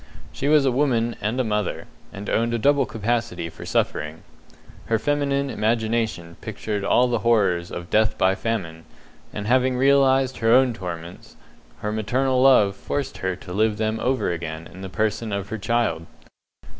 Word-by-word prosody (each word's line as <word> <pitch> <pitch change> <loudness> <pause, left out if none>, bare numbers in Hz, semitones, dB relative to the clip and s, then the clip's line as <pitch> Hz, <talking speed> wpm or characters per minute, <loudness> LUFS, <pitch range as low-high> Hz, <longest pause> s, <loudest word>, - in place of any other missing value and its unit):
She 140 - -3
was 150 -1 +5
a 135 - +3
woman 120 -3 +1
and 110 +5 -1
a - - +3
mother, 105 -3 -2 0.3
and 100 +1 -8
owned 115 +1 +1
a - - +1
double 140 +3 +3
capacity 110 -6 -2
for - - -10
suffering. 75 +2 -1 0.6
Her 115 - +2
feminine 140 +1 0
imagination 110 -6 -1
pictured 105 -1 -4
all 125 +5 +3
the 120 -2 0
horrors 100 -6 +2
of 85 -1 -7
death 110 0 +2
by 95 +1 +3
famine, 95 -7 -4 0.5
and 105 - -5
having 130 +2 +2
realized 135 -1 +3
her 115 0 +2
own 130 0 +5
torments, 85 -3 -8 0.5
her 105 - -2
maternal 125 +5 0
love 115 -7 +5
forced 140 +7 -4
her 95 -1 -1
to 90 0 -10
live 110 +1 +1
them 110 +1 -1
over 125 -6 0
again 80 -1 -5
in 95 - -11
the 95 - -6
person 110 +3 -1
of 100 -1 -3
her 110 - -4
child. 100 -7 0
110 Hz, 170 wpm, -23 LUFS, 95-125 Hz, 0.6 s, was